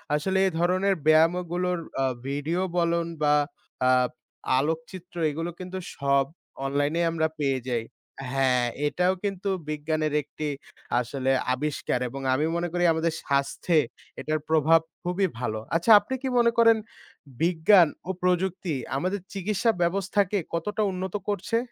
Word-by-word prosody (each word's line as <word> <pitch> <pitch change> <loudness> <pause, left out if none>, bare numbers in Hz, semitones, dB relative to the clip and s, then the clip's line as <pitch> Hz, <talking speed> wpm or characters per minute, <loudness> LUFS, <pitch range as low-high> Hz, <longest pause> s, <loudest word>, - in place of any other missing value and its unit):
আসলে 190 +6 0
এ - - +2
ধরনের 185 +3 +2
ব্যায়ামগুলোর 175 +3 +3 0.2
আ - - +3 0.2
ভিডিও 145 +6 -1 0.2
বলন 170 0 +2 0.2
বা 150 -1 +4 0.5
আ - - +5 0.7
আলোকচিত্র 165 +4 -4 0.2
এগুলো 165 +3 -3
কিন্তু 185 0 -6 0.2
সব 140 -1 +2 0.4
অনলাইনেই 145 +5 +1
আমরা 160 -1 +1
পেয়ে 135 -2 +1
যাই। 120 -3 -1 0.5
হ্যাঁ। 130 -2 +2 0.2
এটাও 180 +5 +1
কিন্তু 200 -1 -2 0.2
বিজ্ঞানের 155 0 -1
একটি 150 +2 -6 0.5
আসলে 130 +2 -1 0.2
আবিষ্কার 145 -1 -2
এবং 135 +3 -7
আমি 145 +4 +1
মনে 170 +1 -1
করি 175 0 0
আমাদের 160 0 0
স্বাস্থ্যে 140 +4 +1 0.4
এটার 155 0 -1
প্রভাব 160 +1 +5 0.2
খুবই 180 +2 +1
ভালো। 110 -3 -2 0.2
আচ্ছা 170 +7 +3
আপনি 205 +6 -6
কি 270 - -2
মনে 235 -1 +4
করেন 230 -1 +6 0.6
বিজ্ঞান 175 +2 +5 0.2
ও - - +3
প্রযুক্তি 180 -1 0 0.2
আমাদের 185 +7 -1
চিকিৎসা 205 +3 +1
ব্যবস্থাকে 195 +3 +1 0.2
কতটা 210 +6 -2
উন্নত 185 +1 -4
করছে? 205 +3 -1
170 Hz, 135 wpm, -26 LUFS, 150-185 Hz, 0.7 s, করেন